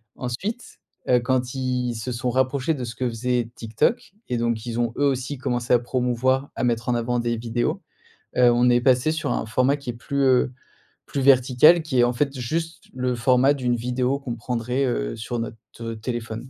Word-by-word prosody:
Ensuite, 185 - -5 0.3
heu, 125 - +4
quand 125 +1 0
ils 125 -2 -1
se 115 +3 -4
sont 125 +1 -2
rapprochés 130 +4 +1
de 130 -5 -5
ce 120 -1 -5
que 125 +2 -1
faisait 120 0 -1
TikTok 115 - -1 0.2
et 120 - -1
donc 115 -1 -1
ils 120 0 -3
ont 120 -1 +1
eux 145 - +2
aussi 135 +1 -1
commencé 120 -1 -2
à 120 - +6
promouvoir 130 +2 0
à - - -3
mettre 120 0 0
en 120 - +2
avant 120 +1 0
des 120 -1 -1
vidéos. 120 +1 -2 0.6
Heu, 125 -1 +6
on 120 +1 +3
est 120 0 +4
passé 130 +4 +3
sur 160 -2 -1
un - - -2
format 130 +5 +2
qui 140 -4 -8
est - - -2
plus, 140 +4 -3
heu, 130 -1 +3 0.5
plus 140 - -3
vertical. 135 +5 +5
Qui 130 -6 -1
est - - +6
en 120 - 0
fait 135 +2 -1
juste 165 +7 -3
le 125 0 -1
format 125 +3 +4
d'une 125 -3 0
vidéo 125 +3 -1
qu'on 125 -4 -5
prendrait, 125 +3 -2
heu, - - -2
sur 120 +2 -4
notre, 115 -1 -5 0.2
heu, 115 0 -4
téléphone. 120 +1 -5
125 Hz, 205 wpm, -23 LUFS, 120-130 Hz, 0.6 s, à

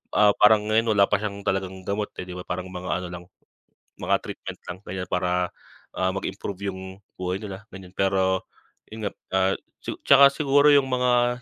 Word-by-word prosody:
ah, 105 -1 +6
parang 105 0 +5
ngayon, 115 +1 +3
wala 100 - +6
pa 100 0 +2
siyang 100 -1 -5
talagang 95 -1 -2
gamot, 105 +2 -2
eh, - - -5
'di 90 - -9
ba? 90 0 -8
Parang 90 +1 -4
mga 90 0 -3
ano - - -5
lang, 90 0 -7 0.8
mga - - +2
treatment - - -7
lang 90 - -8
ganiyan 90 0 -5
para, 90 0 0 0.5
ah, 95 0 +2
mag-improve 100 0 -4
yung 95 0 -9 0.2
buhay 90 +2 -3
nila 100 +1 -8
ganiyan, 95 -1 -11
pero 95 -1 +1 0.4
yun 110 0 -9
nga, - - -4 0.2
ah, 95 0 +3 0.3
tsu - - -5
tsaka 140 0 +8
siguro 145 +1 +3
yung 140 -2 +6
mga 125 -1 +1
95 Hz, 185 wpm, -25 LUFS, 95-110 Hz, 0.8 s, tsaka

